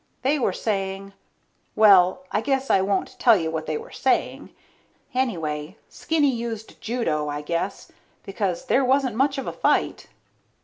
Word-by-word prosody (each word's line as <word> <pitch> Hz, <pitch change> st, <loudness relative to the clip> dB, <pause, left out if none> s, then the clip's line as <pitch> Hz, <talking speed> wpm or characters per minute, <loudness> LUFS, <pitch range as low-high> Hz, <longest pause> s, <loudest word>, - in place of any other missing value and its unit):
They 285 Hz, +3 st, +2 dB
were -, -, +1 dB
saying... 195 Hz, -2 st, -3 dB, 0.6 s
Well, 200 Hz, +2 st, +5 dB
I 210 Hz, -, 0 dB
guess 270 Hz, +1 st, 0 dB
I 190 Hz, -, +4 dB
won't 195 Hz, 0 st, -2 dB
tell 230 Hz, -3 st, +6 dB
you 160 Hz, -2 st, -2 dB
what 160 Hz, -1 st, -4 dB
they -, -, -1 dB
were 460 Hz, +2 st, -10 dB
saying. -, -, -1 dB, 0.6 s
Anyway, 165 Hz, -, -2 dB
Skinny 300 Hz, -4 st, +1 dB
used 230 Hz, -2 st, -6 dB
judo, 215 Hz, -11 st, -1 dB
I 145 Hz, 0 st, -4 dB
guess, 170 Hz, +5 st, -3 dB, 0.3 s
because 195 Hz, +1 st, -3 dB
there 265 Hz, +1 st, +2 dB
wasn't 260 Hz, -2 st, +1 dB
much 270 Hz, +3 st, +1 dB
of 270 Hz, -, -4 dB
a -, -, -4 dB
fight. -, -, 0 dB
215 Hz, 150 wpm, -24 LUFS, 180-260 Hz, 0.6 s, tell